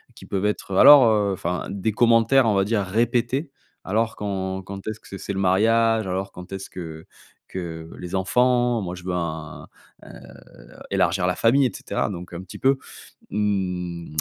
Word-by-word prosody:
qui -, -, -13 dB
peuvent 100 Hz, +1 st, -2 dB
être: 105 Hz, -2 st, -2 dB
«Alors, 140 Hz, +5 st, +9 dB
heu» 105 Hz, -3 st, +2 dB
Enfin, 90 Hz, 0 st, -3 dB
des 100 Hz, +2 st, -2 dB
commentaires 115 Hz, +3 st, +4 dB
on 105 Hz, -, +2 dB
va 95 Hz, 0 st, +2 dB
dire 105 Hz, -1 st, 0 dB
répétés: 120 Hz, -, 0 dB, 0.3 s
«Alors 110 Hz, +3 st, -1 dB
quand 95 Hz, -2 st, -3 dB
quand 95 Hz, 0 st, -9 dB
est-ce 110 Hz, 0 st, -4 dB
que -, -, -18 dB
c'est 100 Hz, -, -8 dB
c'est 100 Hz, -, -5 dB
le 95 Hz, -, -3 dB
mariage? 110 Hz, +3 st, +3 dB
Alors 95 Hz, +1 st, -3 dB
quand 90 Hz, +1 st, -11 dB
est-ce 95 Hz, 0 st, -6 dB
que 80 Hz, -3 st, -8 dB, 0.4 s
que 80 Hz, -3 st, -6 dB
les 90 Hz, +2 st, -5 dB
enfants? 120 Hz, +4 st, +2 dB
Moi 90 Hz, -1 st, -5 dB
je 90 Hz, -, -11 dB
veux 90 Hz, -1 st, -3 dB
un 80 Hz, -3 st, -5 dB, 0.4 s
,heu, -, -, -13 dB, 0.8 s
élargir 90 Hz, -, +1 dB
la 90 Hz, -, 0 dB
famille», 130 Hz, +4 st, +3 dB
et -, -, -6 dB
cetera. -, -, -2 dB
Donc 90 Hz, -2 st, -8 dB
un 85 Hz, -, -6 dB
petit 90 Hz, -, -10 dB
peu, 135 Hz, 0 st, +3 dB, 0.5 s
mmh, 90 Hz, -5 st, -2 dB
100 Hz, 180 wpm, -23 LUFS, 90-115 Hz, 0.8 s, Alors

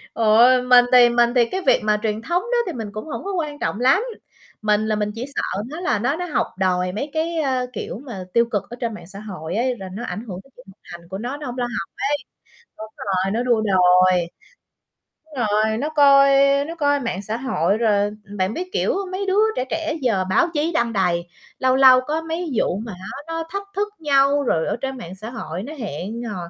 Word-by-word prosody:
Trời 220 Hz, -1 st, +3 dB
ơi, 250 Hz, +2 st, +6 dB
mình 250 Hz, -1 st, +6 dB
thì 245 Hz, -1 st, +8 dB
mình 240 Hz, 0 st, +3 dB
thì 240 Hz, -2 st, +5 dB
cái 375 Hz, +11 st, -4 dB
việc -, -, +5 dB
mà 210 Hz, 0 st, +2 dB
truyền 215 Hz, 0 st, -1 dB
thống 345 Hz, +8 st, 0 dB
đó 480 Hz, +3 st, -1 dB
thì 355 Hz, -, -3 dB
mình 225 Hz, -4 st, -5 dB
cũng 215 Hz, +1 st, -7 dB
hổng 315 Hz, -, -6 dB
có 395 Hz, +1 st, -4 dB
quan 305 Hz, -5 st, -3 dB
trọng 205 Hz, -, -2 dB
lắm. 265 Hz, -, +4 dB, 0.6 s
Mình 215 Hz, 0 st, +2 dB
là 215 Hz, -, +1 dB
mình 210 Hz, 0 st, -1 dB
chỉ 235 Hz, +2 st, -4 dB
sợ 195 Hz, -, -2 dB
nó 310 Hz, +4 st, -6 dB
là 360 Hz, -, 0 dB
nó 245 Hz, +7 st, 0 dB
nó 355 Hz, +2 st, -4 dB
học 310 Hz, -7 st, 0 dB
đòi 180 Hz, -1 st, +1 dB
mấy 250 Hz, +10 st, -4 dB
cái, 325 Hz, +1 st, -1 dB
ơ, 260 Hz, -4 st, 0 dB
kiểu -, -, -5 dB
mà 210 Hz, -8 st, -6 dB
tiêu 235 Hz, 0 st, +4 dB
cực 205 Hz, -, 0 dB
ở 240 Hz, -, -8 dB
trên 230 Hz, -2 st, -2 dB
mạng 210 Hz, -, -10 dB
xã 195 Hz, +1 st, -10 dB
hội 185 Hz, -5 st, -6 dB
ấy, 245 Hz, +2 st, 0 dB
là 190 Hz, -2 st, -8 dB
nó 220 Hz, +5 st, -6 dB
ảnh 190 Hz, +5 st, -5 dB
hưởng 185 Hz, -3 st, -6 dB
đến 270 Hz, -, -24 dB
chuyện 250 Hz, -, -16 dB
học 190 Hz, -, -24 dB
hành 175 Hz, -1 st, -10 dB
của 190 Hz, -, -5 dB
nó, 245 Hz, +7 st, -4 dB
nó 295 Hz, -, -8 dB
hổng 250 Hz, 0 st, -6 dB
lo 250 Hz, -, -1 dB
học 240 Hz, -8 st, -5 dB, 0.2 s
ấy. 290 Hz, -, +1 dB, 0.6 s
Đúng 215 Hz, 0 st, -8 dB
rồi, 190 Hz, 0 st, -1 dB
nó 230 Hz, +3 st, 0 dB
đua 240 Hz, -3 st, +2 dB
đòi. 185 Hz, -3 st, +4 dB, 1.0 s
Đúng 315 Hz, -2 st, -16 dB
rồi, 215 Hz, +1 st, +1 dB
nó 285 Hz, +6 st, -2 dB
coi 280 Hz, -2 st, +6 dB, 0.4 s
nó 330 Hz, -, -6 dB
coi 285 Hz, -3 st, +1 dB
mạng 230 Hz, -7 st, -3 dB
xã 215 Hz, +3 st, -4 dB
hội 205 Hz, -, 0 dB
rồi 205 Hz, -3 st, +2 dB, 0.3 s
bạn 190 Hz, +2 st, 0 dB
biết, 365 Hz, +6 st, -5 dB
kiểu, -, -, +1 dB, 0.2 s
mấy 380 Hz, +2 st, -3 dB
đứa 385 Hz, +2 st, +2 dB, 0.2 s
trẻ 255 Hz, -, -1 dB
trẻ 320 Hz, -1 st, -2 dB
giờ 215 Hz, -8 st, +1 dB
báo 190 Hz, -, +3 dB
chí 310 Hz, +2 st, 0 dB
đăng 235 Hz, -6 st, 0 dB
đầy. 175 Hz, -3 st, 0 dB, 0.3 s
Lâu 260 Hz, 0 st, +3 dB
lâu 260 Hz, -1 st, +7 dB
có 305 Hz, +5 st, -2 dB
mấy 325 Hz, 0 st, -4 dB
vụ 190 Hz, -, +1 dB
mà 220 Hz, 0 st, -6 dB
á, 190 Hz, +8 st, -8 dB
nó 330 Hz, 0 st, -3 dB
thách 400 Hz, +2 st, -4 dB
thức 410 Hz, +1 st, 0 dB
nhau 285 Hz, -1 st, +3 dB
rồi 160 Hz, -11 st, 0 dB
ở -, -, -1 dB
trên 270 Hz, 0 st, -3 dB
mạng 185 Hz, -7 st, -8 dB
xã 215 Hz, +4 st, -8 dB
hội 185 Hz, -7 st, -6 dB
nó 285 Hz, +7 st, -7 dB
hẹn 215 Hz, -, -5 dB
hò 220 Hz, -4 st, -5 dB
235 Hz, 240 wpm, -21 LUFS, 205-285 Hz, 1.0 s, thì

